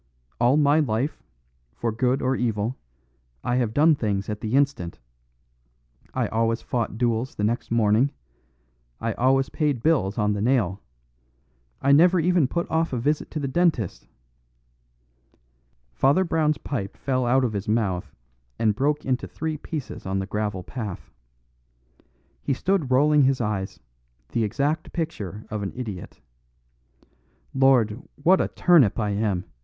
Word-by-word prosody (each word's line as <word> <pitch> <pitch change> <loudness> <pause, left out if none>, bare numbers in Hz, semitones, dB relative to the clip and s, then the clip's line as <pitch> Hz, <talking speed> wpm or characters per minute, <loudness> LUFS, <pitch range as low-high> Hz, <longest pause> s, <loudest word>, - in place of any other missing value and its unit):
All 125 +4 +4
my 145 +1 +4
life, 135 0 -1 0.5
for 115 - -2
good 125 +4 0
or 130 +1 +1
evil, 115 -1 -1 0.7
I 120 - 0
have 120 -4 0
done 155 +6 +5
things 105 -7 -2
at 105 0 -4
the 110 +3 -1
instant; 140 - 0 1.1
I - - 0
always 115 +1 0
fought 115 -3 -2
duels 120 +1 0
the 105 - -3
next 115 +3 -1
morning; 115 +3 +3 0.9
I 115 - -2
always 135 +3 +2
paid 145 -7 -1
bills 135 -12 +2
on 105 -1 +1
the 100 - -3
nail; 110 -6 +1 1.0
I 140 - +4
never 175 +5 +6
even 170 -3 +3
put 170 +6 -2
off 160 -2 0
a - - 0
visit 145 +6 -1
to 155 - -4
the 140 - -2
dentist 140 - 0 1.0
" - - -41
Father 145 +8 +4
Brown's 155 -3 +1
pipe 110 -11 -5
fell 130 -2 -1
out 130 +2 +3
of 120 -3 0
his 100 0 -4
mouth 105 -5 0 0.5
and 110 -2 +2
broke 145 +6 0
into 130 -1 -1
three 160 -1 -4
pieces 150 - -6
on 95 +1 -1
the 95 - -1
gravel 105 -2 -3
path. 105 -3 -7 1.3
He 140 - 0
stood 185 -3 0
rolling 145 +3 +4
his 135 -1 +3
eyes, 105 -4 -3 0.5
the 115 - 0
exact 140 +9 -1
picture 110 - -4
of 105 -1 -3
an 100 - -3
idiot. 110 -8 -7 1.3
"Lord, 130 -4 +3
what 180 +6 +3
a - - 0
turnip 160 - +4
I 105 -2 0
am!" 100 -3 -1
120 Hz, 150 wpm, -24 LUFS, 105-145 Hz, 1.3 s, never